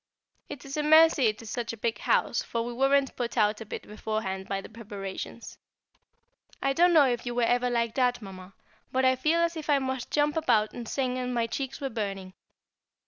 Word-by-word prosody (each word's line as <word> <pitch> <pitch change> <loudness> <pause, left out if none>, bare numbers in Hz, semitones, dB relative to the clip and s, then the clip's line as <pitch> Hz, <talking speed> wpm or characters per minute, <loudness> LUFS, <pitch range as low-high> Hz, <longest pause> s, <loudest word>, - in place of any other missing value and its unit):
It 285 -3 -8
is 275 +2 -6
a - - +1
mercy 315 -3 +6
it 215 +1 -2
is 215 - -8
such 235 -1 -3
a - - -8
big 225 +1 -2
house, - - +1
for 230 -1 -3
we 240 - -5
weren't 270 +2 +2
put 240 0 -4
out 210 0 +2
a 220 - -8
bit - - -6
beforehand 210 -3 -4
by 195 - -1
the - - -9
preparations. 210 0 -8 1.0
I 275 0 0
don't 350 +4 +4
know 300 -3 +7
if 240 -2 -1
you 240 -1 -4
were 245 - +1
ever 245 +1 +2
like 235 -2 0
that, 250 -2 +1
Mamma, 190 -2 -11 0.4
but 260 0 +1
I 260 0 +4
felt 310 +6 +2
as 335 0 -4
if 315 -1 -7
I 290 - +5
must 260 -2 -3
jump 295 0 +1
about 220 -10 +2
and 240 -2 -7
sing, 255 -2 -1
and 250 0 -3
my 235 -1 +1
cheeks 270 +3 -4
were 275 - -3
burning. 195 -4 -4
245 Hz, 215 wpm, -28 LUFS, 220-275 Hz, 1.0 s, know